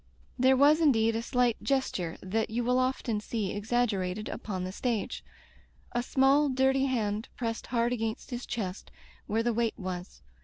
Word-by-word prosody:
There 260 +1 +5
was 295 +4 +5
indeed 230 -7 +4
a 225 - 0
slight 245 -1 +1
gesture 200 -11 -1
that 220 +4 -1
you 235 +2 -1
will 250 +2 +2
often 255 -4 0
see 210 -2 -3
exaggerated 210 -3 -1
upon 190 -4 -4
the 185 - -4
stage 230 +1 -2 0.3
— - - -29
3, 240 - +1
small 270 +3 +3
dirty 265 +1 +2
hand 220 -3 -1
pressed 230 -2 -3
hard 240 0 +1
against 225 +1 -3
his 245 0 -5
chest 200 -5 -4 0.4
where 225 +2 +1
the 240 0 +1
weight 230 0 0
was. 180 -1 -6
235 Hz, 165 wpm, -29 LUFS, 210-255 Hz, 0.4 s, There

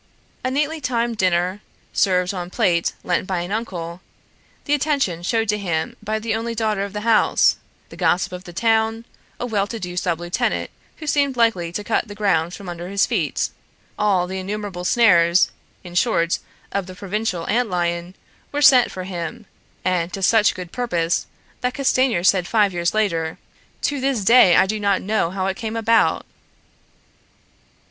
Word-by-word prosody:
A 255 - 0
neatly 300 +4 -1
timed 235 -3 -1
dinner, 185 +1 +1 0.3
served 180 -1 +2
on 180 -2 -5
plate 180 -5 +1
lent 180 +1 0
by 185 -2 -1
an 175 +2 -5
uncle, 180 -6 -4 0.6
the 290 - +1
attention 280 - 0
shown 225 +5 0
to 210 -1 0
him 165 -5 -2
by 215 +1 -2
the 220 0 -2
only 230 +1 -3
daughter 215 -3 0
of 200 - -5
the 210 - -4
house, 225 0 +3 0.3
the - - -11
gossip 185 +1 +1
of 180 0 -8
the 175 - -9
town, 225 +3 +1 0.3
a - - -2
well 205 -4 0
to 225 +2 -6
do 180 -2 -6
sub 175 -2 -1
lieutenant 175 +1 -1 0.3
who 315 - -8
seemed 280 -3 +1
likely 190 -8 +2
to 210 - -3
cut 230 +2 0
the 205 - -9
ground 180 -5 +1
from 200 - -10
under 175 0 -6
his 200 0 +2
feet 175 - -1 0.4
all 200 -4 +2
the 190 +1 -5
innumerable 195 -1 -5
snares, 180 -5 +4 0.3
in 175 -2 -10
short, 175 -3 +1 0.3
of 195 -2 -2
the 185 - -9
provincial 195 -2 -3
ant 235 +2 +1
lion 175 0 -2 0.4
were 290 - -2
set 255 -4 +6
for 185 - -6
him, 185 +4 -6 0.4
and 180 -2 0
to 195 - -4
such 220 +2 +4
good 180 -2 -7
purpose, 175 -9 -1 0.3
that 250 0 -2
Castanier 255 -8 +2
said 185 -2 +3
five 210 -4 +2
years 170 +3 -1
later, 165 -7 0 0.4
"To 285 -2 -1
this 260 -7 0
day 230 -7 +7
I - - +6
do 215 +2 -2
not 200 -2 +1
know 205 -3 +1
how 190 +1 -3
it 195 0 -2
came 225 -1 -4
about!" 225 0 +2
200 Hz, 175 wpm, -21 LUFS, 175-225 Hz, 0.6 s, day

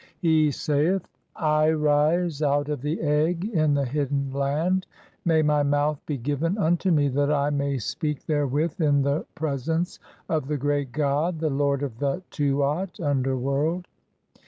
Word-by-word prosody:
He 160 -3 +3
saith 155 +6 0 0.3
:— - - -46
"I 155 0 +2
rise 155 +1 +2
(3) 150 - +1
out 145 +1 +1
of 145 -4 -3
the 150 +4 -2
egg 160 +4 +1
in 155 -9 +1
the 140 -1 +1
hidden 140 0 -1
land. 155 +7 0 0.4
May 160 -2 +3
my 150 -1 +3
mouth 145 +1 +1
"be 150 - -2
given 145 +8 -1
(4) 210 - -1
unto 175 +4 +2
me 150 -4 +3
that 145 +2 +1
I 145 0 +1
may 140 -1 0
speak 150 +5 -3
therewith 145 +2 0
in 145 -2 +3
the 140 +3 -1
pre 150 -3 -2
sence 165 +6 -2 0.3
of 155 -5 -1
the 150 0 -1
great 145 -1 -1
god, 150 +5 0
the 155 -1 0
lord 140 0 +1
of 120 -5 -5
the 140 -1 +1
(5) 185 - -7
Tuat 145 +5 -1
(underworld). 140 +4 0
150 Hz, 175 wpm, -25 LUFS, 140-160 Hz, 0.4 s, He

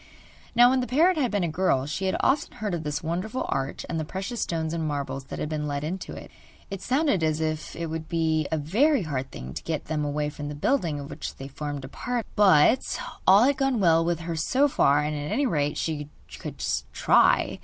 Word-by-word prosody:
Now 245 +1 +7
when 260 - +2
the 250 - -2
parrot 330 +8 +4
had 265 -5 +1
been 205 -4 0
a - - +1
girl 160 -5 +1
she 150 +7 -3
had 190 - +1
often 285 +2 +1
heard 210 -3 -4
of 170 - -2
this 150 0 -3
wonderful 185 +9 -2
arch 135 0 -2
and 165 - -2
the - - -1
precious 195 +8 -4
stones 160 -1 -2
and 165 -2 -1
marbles 140 -2 -3
that - - -7
had - - -2
been 150 -1 -3
let 145 0 -3
into 180 +5 -4
it. - - -10 0.4
It 195 -1 -5
sounded 265 - +1
as 155 -1 +1
if 155 -1 -3
it 170 - -3
would 160 0 -5
be 160 -2 +1
a 160 - +1
very 225 - +2
hard 135 -4 -3
thing 65 - -8
to - - -5
get 160 -2 -3
them 150 -1 -2
away 150 0 -1
from 145 0 -6
the 150 - -5
building 160 - 0
of 140 0 -8
which 145 +1 -6
they 135 - -8
formed 145 -1 -5
a - - -7
part, 240 - -3
but 200 - +4 0.3
all 195 +4 +8
had 275 +2 +3
gone 270 -3 +1
well 165 -3 +4
with 170 -1 -1
her 165 0 -4
so 255 - +2
far, 150 - +3
and 150 0 -2
at 145 0 -4
any 275 +7 +1
rate 150 - 0
she 150 -2 -3 0.3
could - - -7
but - - -1
try. - - +3
160 Hz, 235 wpm, -26 LUFS, 150-210 Hz, 0.4 s, all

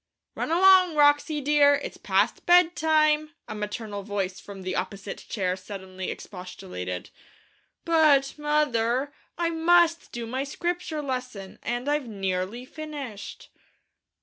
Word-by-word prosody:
'Run - - -3
along, 365 0 +6
Wroxie, 290 +1 +3
dear, 285 0 +5
it's 285 - -6
past - - 0
bedtime!' 315 -3 +4
a - - -5
maternal 210 0 -5
voice 195 -1 -3
from 195 -2 -10
the 185 0 -3
opposite 200 -1 -4
chair 185 -4 -1
suddenly 190 -1 -7
expostulated. 90 - -7 0.7
'But, 305 -5 +4
mother, 285 -3 0 0.2
I 340 -1 0
must 335 0 +3
do 235 -1 -5
my 255 +4 -2
Scripture 335 +1 -3
lesson, 250 -8 -5
and 240 +3 -3
I've 295 -3 0
nearly 195 +3 -3
finished!' 280 -9 -8
270 Hz, 120 wpm, -26 LUFS, 200-310 Hz, 0.7 s, along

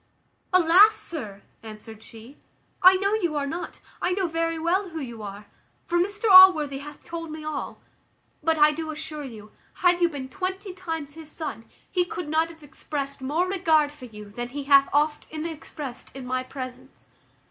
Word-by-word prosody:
"Alas! 370 +4 +6
sir," 265 - -8 0.2
answered 220 0 -11
she, 225 +5 -14 0.5
"I 370 +1 +8
know 395 +2 0
you 345 -8 0
are 285 -1 0
not, 330 +5 -6 0.2
I 360 - +1
know 380 -1 0
very 330 0 -1
well 360 +4 0
who 325 -1 -6
you 235 -6 -7
are; 205 0 -8 0.4
for 345 0 +1
Mr 405 +5 -1
Allworthy 365 -8 +8
hath 295 +1 -11
told 330 -1 -6
me 310 0 -7
all; 305 -2 -5 0.6
but 320 +1 +1
I 300 0 +6
do 315 +1 -5
assure 310 -1 -6
you, 215 -5 -10 0.2
had 355 -1 +3
you 345 - +4
been 280 -4 -6
twenty 375 +6 -4
times 325 -6 -5
his 320 -1 -10
son, 295 -8 -6 0.3
he 360 - +2
could 350 -2 -6
not 320 +2 +1
have 320 -2 -14
expressed 280 -1 -6
more 310 +7 0
regard 320 -6 +2
for 295 -4 -12
you 210 -3 -11
than 240 +3 -5
he 285 +3 -5
hath 275 0 +5
often 305 +1 -1
expressed 295 -5 -7
in 265 -2 -7
my 255 0 -1
presence. 255 0 -9
310 Hz, 180 wpm, -25 LUFS, 270-345 Hz, 0.6 s, I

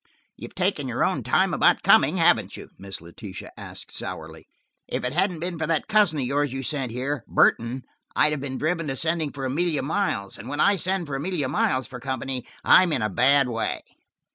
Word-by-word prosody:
"You've - - -10
taken - - 0
your - - -1
own - - 0
time - - +2
about - - +3
coming, - - +5
haven't - - +3
you?" - - -10
Miss 95 -2 -7
Letitia 95 +4 -10
asked - - -10
sourly. - - -7 0.4
"If - - -3
it 125 - -2
hadn't 180 -1 0
been 175 -1 -4
for 160 - -1
that 165 -1 0
cousin 210 -7 +3
of 135 - -1
yours 145 +1 0
you 135 +1 -4
sent 135 -3 -1
here, 130 +2 -3
Burton, 120 +3 +2 0.3
I'd 150 - +4
have 150 -2 -2
been 135 -2 -4
driven 165 +1 -1
to 135 -1 -3
sending 160 -1 0
for 135 -2 -5
Amelia 150 +2 0
Miles, 140 - -2
and 115 - -8
when 145 +1 -4
I 200 +4 +4
send 185 +1 0
for 145 - -7
Amelia 145 -1 -2
Miles 130 0 +1
for 125 -2 -9
company, 130 0 -4 0.2
I'm 180 -2 +6
in 130 -7 0
a 105 - -1
bad 135 +5 +4
way." 115 -2 -2
140 Hz, 205 wpm, -24 LUFS, 125-165 Hz, 0.4 s, I'm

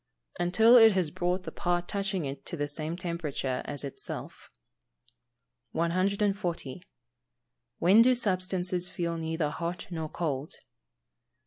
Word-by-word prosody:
_ - - +1
Until 220 +7 +6
it 225 -2 +8
has 180 -5 0
brought 180 +1 -1
the - - -6
part 175 0 -1
touching 195 -4 -2
it 135 0 -6
to 170 - -5
the 145 0 -1
same 155 +3 -4
temperature 155 -7 -3
as 145 -1 -2
itself. 140 - -7 1.2
140. 185 -2 -1 1.0
_When 195 +6 +6
do 255 +2 +5
substances 185 -4 0
feel 170 -1 -2
neither 160 -2 -1
hot 170 +2 -4
nor 160 -2 -4
cold? 150 -4 -3
175 Hz, 125 wpm, -29 LUFS, 160-190 Hz, 1.2 s, it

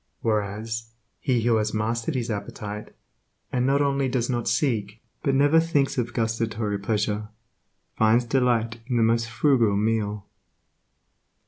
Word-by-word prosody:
Whereas, 110 +1 -2 0.3
he 125 -5 +1
who 115 -1 +3
has 105 0 -1
mastered 115 +6 -1
his 120 -2 -1
appetite, 105 0 -6 0.6
and 125 0 +1
not 140 +1 +3
only 140 -1 +1
does 125 -1 0
not 120 -2 -2
seek, 110 -2 0 0.2
but 140 -3 +1
never 145 +4 +5
thinks 150 -4 +1
of 120 -1 -2
gustatory 110 -2 -1
pleasure, 105 0 -1 0.7
finds 110 +2 +3
delight 120 -2 +1
in 125 -3 0
the 115 - +4
most 115 +1 +2
frugal 115 -4 +3
meal. 105 -1 -1
115 Hz, 135 wpm, -25 LUFS, 110-125 Hz, 0.7 s, never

